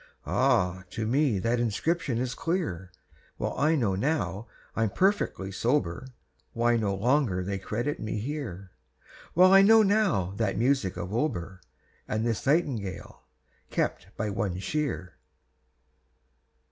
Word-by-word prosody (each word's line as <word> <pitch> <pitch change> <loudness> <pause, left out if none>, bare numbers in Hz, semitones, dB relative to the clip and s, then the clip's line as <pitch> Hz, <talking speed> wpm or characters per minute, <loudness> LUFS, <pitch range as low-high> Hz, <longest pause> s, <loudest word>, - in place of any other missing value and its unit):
Ah! 90 +1 +1
to 110 - -4
me 130 -1 +2
that 115 +5 0
inscription 130 +4 0
is 125 +1 -2
clear; 150 - -3 0.5
Well - - -3
I 155 +3 +2
know 115 -10 +1
now, 100 - -1 0.3
I'm 115 -1 +1
perfectly 185 - 0
sober, 115 - -1 0.5
Why 120 0 +2
no 105 -4 0
longer 115 -3 +1
they 100 +1 -3
credit 120 +9 -3
me 110 0 -3
here, 105 - -5 0.6
Well 185 +3 +7
I 195 - +9
know 220 +2 +7
now 195 - +2
that 115 - 0
music 120 -6 +1
of 90 +4 -5
Auber, 95 - -2 0.5
And 110 +1 -1
this 115 +2 -2
Nightingale, 130 - -1 0.5
kept 90 - -1
by 105 -1 -2
one 100 -2 -2
Shear." 115 - -3
115 Hz, 130 wpm, -28 LUFS, 95-150 Hz, 0.6 s, I